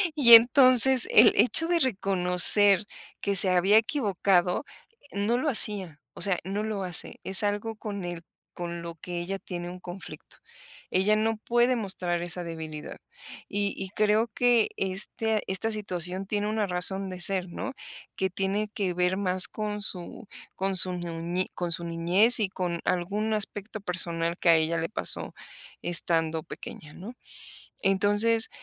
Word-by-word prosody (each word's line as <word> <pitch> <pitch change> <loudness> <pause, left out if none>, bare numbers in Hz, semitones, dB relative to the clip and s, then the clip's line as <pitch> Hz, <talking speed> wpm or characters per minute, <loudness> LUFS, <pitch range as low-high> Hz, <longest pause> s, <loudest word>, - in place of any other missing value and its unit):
Y 235 -6 +8
entonces, 255 +1 +6
el 220 +1 +5
hecho 325 +6 +3
de 345 0 0
reconocer 195 - +4 0.4
que 200 - -2
se 190 0 +9
había 185 +4 +2
equivocado, 200 - -1 0.5
no 205 +4 -2
lo 300 +4 -2
hacía, 195 - +2
o - - -12
sea, 195 -3 0
no 200 +3 -4
lo 215 -3 -5
hace. 180 -4 -3
Es 190 +2 +5
algo 205 +2 -4
con 200 -4 -7
el 175 -1 -8 0.3
con 170 -1 -7
lo 170 0 -9
que 175 +2 -8
ella 190 +3 -5
tiene 175 -2 -8
un 180 +1 -11
conflicto. 180 +1 -12 0.5
Ella 200 +3 +1
no 220 0 -2
puede 240 +3 0
mostrar 185 -6 -3
esa 175 +1 -3
debilidad. 160 -2 -9 0.5
Y 200 0 -2
y 190 - -7
creo 215 +3 0
que, 245 -2 +1
este 210 +3 -3
esta 190 +4 -2
situación 185 -3 -3
tiene 205 0 -3
una 215 -1 -2
razón 190 +2 -1
de 185 - -9
ser, 185 0 -1
¿no?, 265 +9 -7 0.4
que 190 - -2
tiene 195 +3 -3
que 195 -6 -3
ver 180 +1 -1
más 185 -2 +2
con 210 -1 -6
su 185 +3 -5 0.3
con 195 0 -3
su 185 0 +4
nuñe 175 +1 -5
con 175 -1 -5
su 170 +1 0
niñez 175 +8 +4
y 210 -3 -1
con 180 -2 -5
algún 205 +5 -3
aspecto 210 0 -3
personal 170 -3 -2
que 170 - +1
a 165 - +6
ella 160 +1 -1
le 165 - -5
pasó - - +1 0.5
estando 165 -2 +2
pequeña, 150 0 -12
¿no? 210 +7 -11 0.7
Entonces, 205 +4 +1
195 Hz, 155 wpm, -25 LUFS, 175-215 Hz, 0.7 s, se